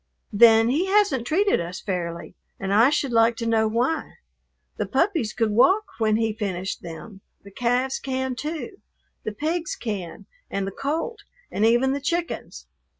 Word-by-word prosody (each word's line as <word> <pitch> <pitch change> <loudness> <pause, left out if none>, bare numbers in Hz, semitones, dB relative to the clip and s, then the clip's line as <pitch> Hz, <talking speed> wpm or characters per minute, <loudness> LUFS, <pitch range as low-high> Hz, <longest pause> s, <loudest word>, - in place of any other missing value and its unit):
"Then 225 +1 +6
He 320 +9 +1
hasn't 380 - +2
treated 400 +5 +2
us 175 +3 -6
fairly, 170 -4 -4 0.3
and 195 0 -2
I 230 +5 +6
should 285 -3 0
like 230 0 +4
to 230 - -4
know 225 -1 +2
why. 250 +8 -1 0.6
The - - -2
puppies 270 - +1
could 225 -2 0
walk 370 - +4 0.2
when 215 -1 +2
He 225 -1 0
finished 195 -3 -4
them; 185 +4 -9 0.2
the 200 - -13
calves 250 +4 0
can, 260 -1 -2
too. 320 - -6 0.4
The 215 - -2
pigs 320 +9 -2
can, 200 -7 -5 0.2
and 195 -1 -2
the 195 - -4
colt, 320 - -3 0.3
and 210 - -1
even 245 +3 +3
the 280 - -3
chickens. 340 +4 -3
235 Hz, 160 wpm, -24 LUFS, 210-295 Hz, 0.6 s, Then